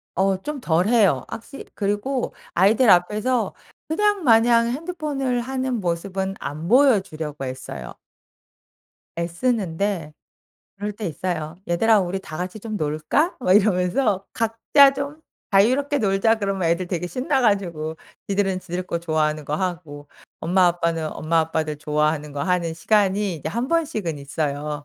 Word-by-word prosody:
어 190 Hz, +1 st, +2 dB
좀 300 Hz, +3 st, -5 dB
덜 175 Hz, +4 st, +2 dB
해요. 205 Hz, -, +3 dB
확시 250 Hz, +4 st, -9 dB
그리고 205 Hz, +6 st, -1 dB, 0.2 s
아이들 210 Hz, +6 st, +4 dB
앞에서 210 Hz, +5 st, +2 dB, 0.3 s
그냥 410 Hz, +3 st, +1 dB
마냥 230 Hz, -1 st, +5 dB
핸드폰을 275 Hz, -3 st, -2 dB
하는 260 Hz, -1 st, -2 dB
모습은 190 Hz, +2 st, -2 dB
안 155 Hz, +3 st, -5 dB
보여 255 Hz, -1 st, +5 dB
주려고 155 Hz, -6 st, -6 dB
애써요. 70 Hz, -, -7 dB, 1.2 s
애쓰는데 175 Hz, -2 st, -1 dB, 0.6 s
그럴 205 Hz, +1 st, -4 dB
때 210 Hz, 0 st, -6 dB
있어요. 160 Hz, -1 st, -3 dB
"얘들아 215 Hz, +5 st, +4 dB
우리 190 Hz, +1 st, -2 dB
다 155 Hz, -4 st, -8 dB
같이 180 Hz, +4 st, -5 dB
좀 215 Hz, -1 st, -5 dB
놀까?" 155 Hz, -, 0 dB
막 185 Hz, -7 st, +2 dB
이러면서 195 Hz, +1 st, +2 dB
"각자 230 Hz, +5 st, +4 dB
좀 285 Hz, +3 st, -5 dB, 0.3 s
자유롭게 260 Hz, +9 st, +3 dB
놀자." 205 Hz, +2 st, +2 dB
그러면 195 Hz, -4 st, -1 dB
애들 170 Hz, +2 st, 0 dB
되게 175 Hz, -1 st, -3 dB
신나 265 Hz, -, 0 dB
가지고 175 Hz, -8 st, 0 dB, 0.3 s
지들은 195 Hz, -2 st, 0 dB
지들 180 Hz, +1 st, -4 dB
거 170 Hz, -1 st, -2 dB
좋아하는 155 Hz, -2 st, 0 dB
거 145 Hz, -, -2 dB
하고 165 Hz, -5 st, -4 dB, 0.3 s
엄마, 180 Hz, +2 st, +3 dB
아빠는 170 Hz, -2 st, 0 dB
엄마, 165 Hz, +1 st, +1 dB
아빠들 160 Hz, -1 st, -2 dB
좋아하는 150 Hz, 0 st, -1 dB
거 140 Hz, -, -3 dB
하는 180 Hz, -3 st, 0 dB
시간이 200 Hz, +1 st, +1 dB
이제 155 Hz, -, -5 dB
1 235 Hz, +7 st, -2 dB
번씩은 290 Hz, -, -1 dB
있어요. 145 Hz, +1 st, -3 dB
190 Hz, 305 characters per minute, -23 LUFS, 160-230 Hz, 1.2 s, 마냥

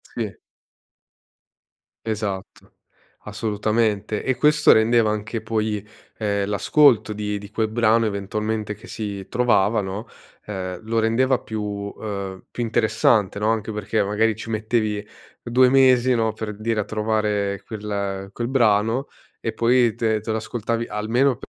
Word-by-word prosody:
Sì. 110 Hz, -4 st, -3 dB, 1.7 s
Esatto. 105 Hz, -4 st, -4 dB, 0.5 s
Assolutamente. 105 Hz, 0 st, -1 dB
E 130 Hz, -, 0 dB
questo 150 Hz, +2 st, +5 dB
rendeva 110 Hz, 0 st, +4 dB
anche 110 Hz, +2 st, -3 dB
poi, 110 Hz, -2 st, -2 dB, 0.3 s
ehm, 100 Hz, -2 st, 0 dB
l'ascolto 115 Hz, +1 st, +4 dB
di 105 Hz, 0 st, -3 dB
di 100 Hz, 0 st, -9 dB
quel 110 Hz, +1 st, -1 dB
brano 115 Hz, 0 st, +3 dB
eventualmente 105 Hz, +1 st, -2 dB
che 105 Hz, -, -15 dB
si 100 Hz, -3 st, -5 dB
trovava, 115 Hz, -3 st, +2 dB
no, 100 Hz, +3 st, -4 dB, 0.4 s
ehm, 95 Hz, -3 st, -5 dB
lo 115 Hz, +1 st, 0 dB
rendeva 125 Hz, +3 st, +2 dB
più, 110 Hz, -3 st, -5 dB
uhm, 100 Hz, -1 st, -5 dB
più -, -, -5 dB
interessante, 110 Hz, -3 st, +2 dB
no. 105 Hz, -, +1 dB
Anche 110 Hz, -1 st, -1 dB
perché 105 Hz, 0 st, -1 dB
magari 105 Hz, +2 st, +1 dB
ci 115 Hz, +1 st, -8 dB
mettevi 110 Hz, -1 st, -1 dB, 0.4 s
2 125 Hz, +1 st, +4 dB
mesi, 130 Hz, -1 st, +5 dB
no, 110 Hz, -1 st, +1 dB
per 110 Hz, -1 st, -5 dB
dire 110 Hz, 0 st, 0 dB
a -, -, -2 dB
trovare 105 Hz, -2 st, -1 dB
quel 100 Hz, -2 st, -4 dB
quel 120 Hz, +2 st, -3 dB
brano 115 Hz, 0 st, +2 dB, 0.3 s
e -, -, -3 dB
poi 120 Hz, -1 st, +3 dB
te 110 Hz, -2 st, +1 dB
te 110 Hz, +1 st, -4 dB
lo 110 Hz, -, 0 dB
ascoltavi 115 Hz, +1 st, -3 dB
almeno 120 Hz, +5 st, +1 dB
110 Hz, 135 wpm, -22 LUFS, 105-115 Hz, 1.7 s, questo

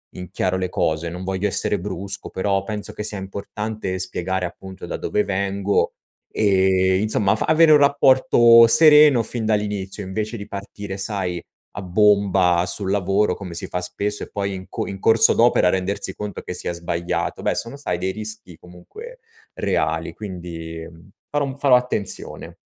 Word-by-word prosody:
in 90 Hz, 0 st, -9 dB
chiaro 95 Hz, 0 st, -1 dB
le 90 Hz, -1 st, -2 dB
cose. 80 Hz, 0 st, -1 dB
Non 90 Hz, +2 st, -7 dB
voglio 95 Hz, +2 st, -2 dB
essere 100 Hz, 0 st, 0 dB
brusco, 100 Hz, +1 st, -6 dB
però 95 Hz, 0 st, -1 dB
penso 105 Hz, -2 st, -5 dB
che 105 Hz, -, -6 dB
sia 105 Hz, -1 st, -3 dB
importante 100 Hz, 0 st, -5 dB
spiegare, 95 Hz, 0 st, -2 dB
appunto, 95 Hz, +2 st, -9 dB
da -, -, -4 dB
dove 105 Hz, -, -1 dB
vengo 100 Hz, 0 st, -1 dB, 0.5 s
e, 95 Hz, -2 st, +3 dB
insomma, 105 Hz, -1 st, +1 dB
fa -, -, -1 dB
avere 160 Hz, 0 st, +5 dB
un 150 Hz, -, +8 dB
rapporto 130 Hz, -5 st, +5 dB
sereno 150 Hz, -2 st, +6 dB
fin 115 Hz, 0 st, -1 dB
dall'inizio, 105 Hz, -2 st, -2 dB
invece 105 Hz, +4 st, -4 dB
di 100 Hz, -3 st, -7 dB
partire, 100 Hz, 0 st, -7 dB
sai, 95 Hz, -3 st, -3 dB, 0.4 s
a -, -, -3 dB
bomba 95 Hz, -2 st, +3 dB
sul 95 Hz, +2 st, +2 dB
lavoro, 100 Hz, +1 st, +1 dB
come 95 Hz, -4 st, -8 dB
si 85 Hz, -, -4 dB
fa 90 Hz, -, -3 dB
spesso 100 Hz, +3 st, -3 dB
e -, -, -9 dB
poi 100 Hz, -1 st, -3 dB
in 95 Hz, 0 st, -7 dB
co -, -, -4 dB
in 95 Hz, -, -7 dB
corso 110 Hz, +2 st, +5 dB
d'opera 115 Hz, -6 st, +3 dB
rendersi 95 Hz, +1 st, -2 dB
conto 105 Hz, -2 st, -6 dB
che -, -, -7 dB
si 90 Hz, -, -5 dB
è -, -, -1 dB
sbagliato. 85 Hz, 0 st, -3 dB
Beh, -, -, 0 dB
sono, 115 Hz, +4 st, -3 dB
sai, 90 Hz, -11 st, -3 dB
dei 95 Hz, +2 st, -2 dB
rischi 110 Hz, -4 st, -7 dB
comunque 435 Hz, -, -13 dB, 0.3 s
reali, -, -, -1 dB
quindi, 85 Hz, -5 st, -8 dB
mhmm, 85 Hz, +3 st, -18 dB, 0.2 s
farò 145 Hz, -1 st, 0 dB
um 135 Hz, -1 st, -6 dB
farò 140 Hz, -2 st, +4 dB
attenzione. 125 Hz, -5 st, -5 dB
100 Hz, 170 wpm, -21 LUFS, 95-110 Hz, 0.5 s, un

